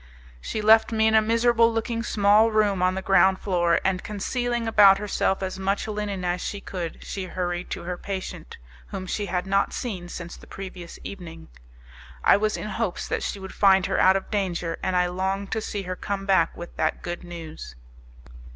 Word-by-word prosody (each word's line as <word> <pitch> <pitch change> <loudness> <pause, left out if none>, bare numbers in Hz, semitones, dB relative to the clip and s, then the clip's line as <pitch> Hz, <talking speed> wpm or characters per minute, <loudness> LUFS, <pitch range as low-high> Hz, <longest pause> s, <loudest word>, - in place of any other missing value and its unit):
She 215 - -4
left 220 +2 +6
me 220 -1 +2
in 220 - +3
a 220 - +6
miserable 230 +1 +3
looking 230 +1 -2
small 210 0 +4
room 210 -4 +2
on 185 0 +2
the 190 - -4
ground 190 0 +4
floor, 175 -4 +1
and 190 -1 0
concealing 240 +3 -2
about 205 -3 +7
herself 195 -1 -1
as 190 0 -4
much 195 +2 -1
linen 205 -3 -3
as 180 0 -1
she 205 - -4
could 175 -4 -6
she 195 -2 -5
hurried 180 -1 -3
to - - -5
her 180 +1 -4
patient, 190 - -6 0.3
whom 185 - -6
she 205 +2 -3
had 180 0 -1
not 195 +1 +1
seen 185 -8 -5
since 170 -1 -7
the - - -15
previous 185 -3 -8
evening. 170 -4 -9 0.7
I - - +6
was 215 +1 0
in 210 - -5
hopes 220 -4 -2
that - - -1
she - - -3
would 190 0 -8
find 190 -2 +4
her - - 0
out 190 +1 +6
of 195 - -3
danger, 175 -5 -2
and 185 - -1
I 180 0 +3
longed 190 +2 -2
to 220 - -1
see 205 -2 -4
her 185 0 -4
come 195 +1 -4
back 190 -4 +2
with 175 - -9
that - - -1
good 175 0 -5
news. 160 - -9
195 Hz, 195 wpm, -25 LUFS, 180-210 Hz, 0.7 s, about